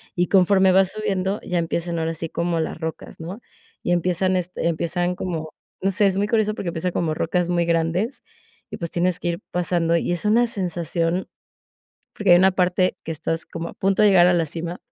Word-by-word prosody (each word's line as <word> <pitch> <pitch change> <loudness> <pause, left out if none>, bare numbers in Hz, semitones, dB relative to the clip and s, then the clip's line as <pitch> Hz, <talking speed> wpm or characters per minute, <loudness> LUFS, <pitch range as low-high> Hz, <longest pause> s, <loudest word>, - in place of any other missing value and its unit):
y 175 0 +1
conforme 190 0 +4
vas 190 -1 +4
subiendo, 200 -2 -2
ya 180 -1 -1
empiezan 170 0 -2
ahora 165 0 -1
así 165 0 -5
como 170 -1 -1
las 160 - -4
rocas, 160 0 -6
¿no?, 185 +8 -7 0.4
y 175 - -1
empiezan, 185 +2 +1
este, 180 -1 -2
empiezan 175 +2 -1
como 165 -4 -4 0.3
no 195 +1 +1
sé, 205 +2 +2
es 190 - 0
muy 205 - +1
curioso 215 -1 +1
porque 175 - -3
empiezan 170 +2 -2
como 160 -3 0
rocas 175 +2 0
muy 175 -1 +1
grandes, 170 +9 0 0.5
y - - -5
pues, 170 - -4
tienes 180 0 0
que - - -4
ir - - -13
pasando, 170 -1 +1
y 175 - -1
es 175 - -4
una 235 +3 +4
sensación 175 -3 -2 0.9
porque 200 -4 +3
hay - - +9
una 190 +1 +5
parte 185 0 +1
que 165 - -3
estás 165 +2 -3
como 165 0 -6
a - - -16
punto 195 +1 +1
de 210 - +7
llegar 180 -3 +6
a 180 - +4
la 165 -1 +2
cima 170 +3 -5
175 Hz, 210 wpm, -22 LUFS, 170-190 Hz, 0.9 s, hay